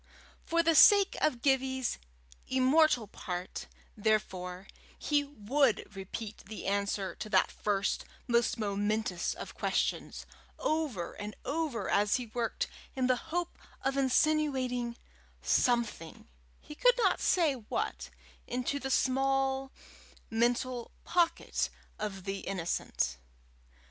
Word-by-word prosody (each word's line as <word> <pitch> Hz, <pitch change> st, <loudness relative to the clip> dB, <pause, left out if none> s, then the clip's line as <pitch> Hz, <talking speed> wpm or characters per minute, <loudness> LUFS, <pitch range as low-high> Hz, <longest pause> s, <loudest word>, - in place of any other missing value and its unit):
For 335 Hz, 0 st, +2 dB
the 330 Hz, 0 st, +4 dB
sake 400 Hz, +5 st, +7 dB
of 245 Hz, -5 st, +1 dB
Gibbie's 265 Hz, -2 st, +1 dB, 0.5 s
immortal 260 Hz, -1 st, +4 dB
part, 180 Hz, -3 st, -6 dB, 0.3 s
therefore, 190 Hz, -4 st, -1 dB, 0.3 s
he 295 Hz, -1 st, +1 dB
would 255 Hz, -4 st, 0 dB
repeat 205 Hz, +3 st, -6 dB
the 215 Hz, 0 st, -7 dB
answer 200 Hz, -1 st, -1 dB
to 215 Hz, -, -7 dB
that 190 Hz, -3 st, +3 dB
first, 200 Hz, -1 st, -1 dB, 0.2 s
most 235 Hz, 0 st, +2 dB
momentous 205 Hz, -3 st, -1 dB
of -, -, -8 dB
questions, -, -, -1 dB, 0.3 s
over 290 Hz, -, -1 dB
and 210 Hz, +1 st, -7 dB
over 280 Hz, -9 st, -1 dB
as 205 Hz, +1 st, +3 dB
he 250 Hz, -, -2 dB
worked, 230 Hz, +1 st, -2 dB, 0.3 s
in 260 Hz, -1 st, +1 dB
the 255 Hz, 0 st, +4 dB
hope 350 Hz, +1 st, -2 dB, 0.2 s
of 270 Hz, +1 st, 0 dB
insinuating 260 Hz, -3 st, +1 dB, 0.4 s
something 235 Hz, -9 st, 0 dB, 0.3 s
he -, -, -11 dB
could -, -, +4 dB
not 395 Hz, -7 st, +2 dB
say 330 Hz, -6 st, +3 dB
what 235 Hz, -5 st, -4 dB, 0.4 s
into 250 Hz, +3 st, -1 dB
the 270 Hz, -, -4 dB
small 270 Hz, 0 st, +1 dB, 0.6 s
mental 240 Hz, +1 st, 0 dB
pocket 345 Hz, -2 st, +1 dB, 0.3 s
of 195 Hz, -3 st, -4 dB
the 195 Hz, +1 st, -3 dB
innocent. 170 Hz, -, -2 dB
245 Hz, 115 wpm, -31 LUFS, 205-275 Hz, 0.6 s, sake